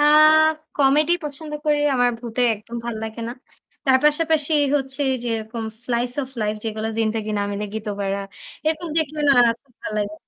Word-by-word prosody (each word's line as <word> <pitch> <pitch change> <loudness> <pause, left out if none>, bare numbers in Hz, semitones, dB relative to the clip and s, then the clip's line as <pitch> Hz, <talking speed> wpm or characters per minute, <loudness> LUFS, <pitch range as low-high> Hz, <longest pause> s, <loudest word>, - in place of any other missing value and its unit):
আ - - +4 0.7
Comedy 290 +4 +4
পছন্দ 300 +1 -7
করি। 300 -1 +3 0.2
আমার 245 -1 +3
ভূতে 240 +1 -2
একদম 220 +3 -9
ভাল 235 -1 -3
লাগে 220 +1 -6
না। - - -4 0.5
তার 265 -2 +5
পাশাপাশি 310 0 +2 0.2
হচ্ছে 270 0 -3 0.2
যেরকম 225 0 -3 0.2
slice 245 +1 -1
of 260 - -6
life 210 0 0
যেগুলো 220 0 -2
"জিন্দেগি 220 -1 0
না - - +1
মিলেগি 210 +1 -4
দোবাড়া।" 200 -1 -2 0.5
এরকম 320 +2 0
দেখলে 310 -1 -2
না - - +8 0.3
খুব 265 -4 -32
ভাল - - -4
লাগে। 205 0 -2
245 Hz, 165 wpm, -22 LUFS, 220-290 Hz, 0.7 s, না